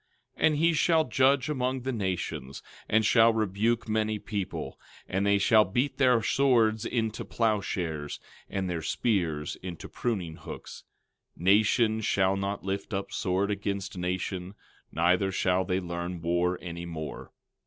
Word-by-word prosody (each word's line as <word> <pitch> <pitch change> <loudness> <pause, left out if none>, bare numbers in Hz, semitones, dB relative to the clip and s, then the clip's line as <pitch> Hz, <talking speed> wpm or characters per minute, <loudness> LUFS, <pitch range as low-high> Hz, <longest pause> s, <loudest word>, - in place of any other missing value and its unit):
12:4 - - +4
And 155 - +2
he 165 +3 +3
shall 160 +1 +3
judge 130 +2 +3
among 130 -3 -1
the 130 +2 -2
nations, 90 - -3 0.3
and 110 0 +3
shall 115 +1 +6
rebuke 110 +2 0
many 110 0 0
people: 100 -2 -5 0.3
and 95 +2 0
they 100 0 +4
shall 110 +2 +5
beat 120 +9 -1
their 125 -4 +4
swords 115 -5 +3
into 110 -2 -1
plow 110 -3 +1
shares, 80 -7 -4 0.3
and 95 -1 -2
their 85 -2 -2
spears 80 -4 -1
into 90 -3 -7
pruning 95 -10 -3
hooks—nation 110 +4 -1
shall 95 -2 +2
not 100 +1 -3
lift 100 +1 -3
up 100 0 -4
sword 95 +2 0
against 100 -1 -3
nation, 90 +1 -3 0.4
neither 90 +4 +2
shall 95 0 +1
they 90 0 0
learn 85 0 -4
war 85 +1 +1
any 85 -1 -6
more. 80 -2 -7
100 Hz, 145 wpm, -28 LUFS, 90-115 Hz, 0.4 s, shall